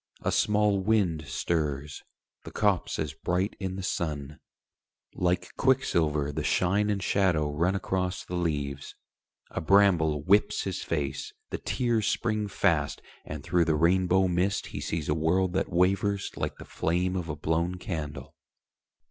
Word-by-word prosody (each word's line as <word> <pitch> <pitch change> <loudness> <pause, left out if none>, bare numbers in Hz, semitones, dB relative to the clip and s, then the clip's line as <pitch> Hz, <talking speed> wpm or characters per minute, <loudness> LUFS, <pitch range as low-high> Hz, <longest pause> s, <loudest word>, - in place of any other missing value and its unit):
A - - +1
small 105 -1 +2
wind 95 -7 +1
stirs, 75 -2 -2 0.4
the - - -8
copse - - 0
is 75 -2 -2
bright 90 +5 -1
in 95 -1 -3
the 95 - -5
sun: 75 -5 -3 0.7
Like 90 0 -1
quicksilver 80 - +2
the - - -3
shine 100 +3 +2
and 100 -2 -1
shadow 85 -6 +2
run 85 +6 +1
Across 95 -1 -2
the - - -8
leaves. 70 -5 -2 0.6
A - - -3
bramble 80 -5 +4
whips 100 +5 +3
his 95 -2 -3
face, 70 -4 -3 0.2
The - - -3
tears 120 -4 0
spring 110 -2 0
fast, 75 -7 0 0.2
and 75 -1 -6
through 85 0 +2
the 80 -2 +2
rainbow 95 +3 +3
mist 90 +3 0
He - - -4
sees 80 -2 -3
a 75 - +2
world 90 +4 +1
that 95 - 0
wavers 95 +3 +1
like - - -3
the - - -11
flame 90 +3 -1
Of 90 -3 -3
a 75 - -2
blown 80 +4 0
candle. 80 -6 -5
90 Hz, 150 wpm, -28 LUFS, 75-95 Hz, 0.7 s, bramble